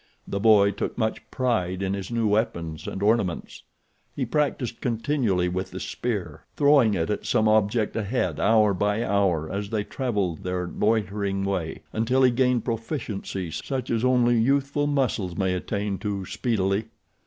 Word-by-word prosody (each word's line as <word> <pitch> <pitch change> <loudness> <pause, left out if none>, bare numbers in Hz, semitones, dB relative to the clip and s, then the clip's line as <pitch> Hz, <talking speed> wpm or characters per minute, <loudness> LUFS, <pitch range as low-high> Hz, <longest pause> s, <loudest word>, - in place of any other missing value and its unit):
The 100 - -2
boy 100 -2 +5
took 100 - -4
much 110 -2 -1
pride 100 -8 -1
in 95 0 -1
his 100 -2 -4
new 115 -2 0
weapons 85 -7 -1
and 95 - -4
ornaments. 105 -5 0 0.5
He 135 - -1
practiced 125 -3 -1
continually 115 -6 0
with 95 +2 -3
the - - -7
spear, 100 - -4
throwing 140 -7 +5
it 80 +1 -1
at - - -2
some 110 - +3
object 110 +1 +2
ahead 110 +3 -1
hour 105 -1 +4
by 105 +4 0
hour 95 -7 +1
as 100 0 -3
they 110 -2 -1
traveled 105 - -2
their 90 -1 -2
loitering 100 -1 0
way, 90 -5 -3
until 125 +4 +2
he 125 - +6
gained 125 -1 +2
a - - -23
proficiency 115 - -4
such 130 - -4
as 115 0 0
only 120 -2 +3
youthful 140 +4 +1
muscles 125 -11 0
may 95 -1 +1
attain 100 +1 -2
to 100 -2 -3
speedily. 100 -2 0
105 Hz, 160 wpm, -25 LUFS, 95-120 Hz, 0.5 s, he